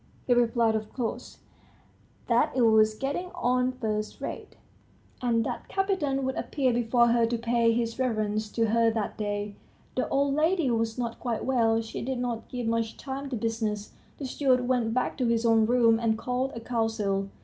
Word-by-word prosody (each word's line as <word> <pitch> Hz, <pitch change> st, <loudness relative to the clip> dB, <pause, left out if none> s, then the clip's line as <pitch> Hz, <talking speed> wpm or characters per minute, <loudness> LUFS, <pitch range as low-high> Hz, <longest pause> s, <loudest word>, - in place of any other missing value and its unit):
He 250 Hz, -, +3 dB
replied, 235 Hz, -1 st, +3 dB
of 215 Hz, -1 st, -3 dB
course, 240 Hz, -4 st, -5 dB, 0.8 s
that 235 Hz, 0 st, +2 dB
it 255 Hz, -, +3 dB
was 220 Hz, -1 st, +5 dB
getting 280 Hz, +9 st, -3 dB
on 250 Hz, +1 st, +1 dB
first 215 Hz, -4 st, -3 dB
rate, -, -, -6 dB, 0.7 s
and 230 Hz, -2 st, +1 dB
that -, -, -5 dB
Kapiton 365 Hz, -9 st, 0 dB
would 265 Hz, -, -1 dB
appear 260 Hz, -3 st, 0 dB
before 235 Hz, 0 st, +3 dB
her 230 Hz, -1 st, +3 dB
to 235 Hz, +1 st, -1 dB
pay 230 Hz, 0 st, +2 dB
his 230 Hz, +1 st, -1 dB
reverence 215 Hz, -4 st, -1 dB
to 230 Hz, -2 st, +1 dB
her 230 Hz, +1 st, +4 dB
that 220 Hz, -2 st, -2 dB
day. 205 Hz, -1 st, -3 dB, 0.4 s
The -, -, -1 dB
old 280 Hz, 0 st, +1 dB
lady 315 Hz, -1 st, +2 dB
was 225 Hz, 0 st, -1 dB
not 235 Hz, -2 st, -3 dB
quite 235 Hz, -4 st, -3 dB
well; 230 Hz, -3 st, +2 dB
she 225 Hz, -, -6 dB
did 260 Hz, +1 st, -2 dB
not 240 Hz, -2 st, -3 dB
give 245 Hz, -2 st, -4 dB
much 225 Hz, -1 st, -1 dB
time 275 Hz, +1 st, -5 dB
to 260 Hz, -, -3 dB
business. 220 Hz, -2 st, -2 dB, 0.3 s
The 280 Hz, -, -5 dB
steward 255 Hz, -2 st, +1 dB
went 245 Hz, -3 st, +1 dB
back 255 Hz, +2 st, -1 dB
to 250 Hz, -, +1 dB
his 230 Hz, 0 st, +1 dB
own 225 Hz, -1 st, +4 dB
room, 230 Hz, -2 st, +4 dB
and 225 Hz, -1 st, +1 dB
called 250 Hz, +3 st, -2 dB
a -, -, -4 dB
council. 220 Hz, -4 st, -1 dB
235 Hz, 180 wpm, -27 LUFS, 225-255 Hz, 0.8 s, was